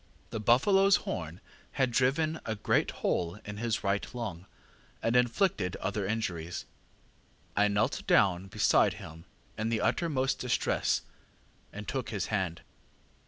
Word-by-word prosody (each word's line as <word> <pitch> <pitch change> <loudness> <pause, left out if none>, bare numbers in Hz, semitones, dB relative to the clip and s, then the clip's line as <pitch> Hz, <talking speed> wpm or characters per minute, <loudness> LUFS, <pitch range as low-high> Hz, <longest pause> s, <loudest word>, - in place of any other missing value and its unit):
The 110 - -3
buffaloŌĆÖs 195 - +5
horn 80 0 -4 0.3
had 130 -2 +1
driven 150 +6 +1
a 110 - -3
great 105 - +1
hole 85 +2 -1
in 105 0 -6
his 115 0 -1
right 100 0 +1
lung, 100 -7 -5 0.6
and 115 - +1
inflicted 120 - +2
other 100 0 -2
injuries. 90 -6 -3 0.9
ŌĆ£I 105 0 +3
knelt 100 +2 0
down 95 -1 +3
beside - - +3
him 80 +1 -11 0.3
in 110 +1 0
the 115 -2 0
uttermost 140 -6 +1
distress, 125 -1 0 0.7
and 105 +1 -8
took 130 -3 -3
his 105 -5 -2
hand. 95 -5 -1
110 Hz, 130 wpm, -30 LUFS, 95-125 Hz, 0.9 s, buffaloŌĆÖs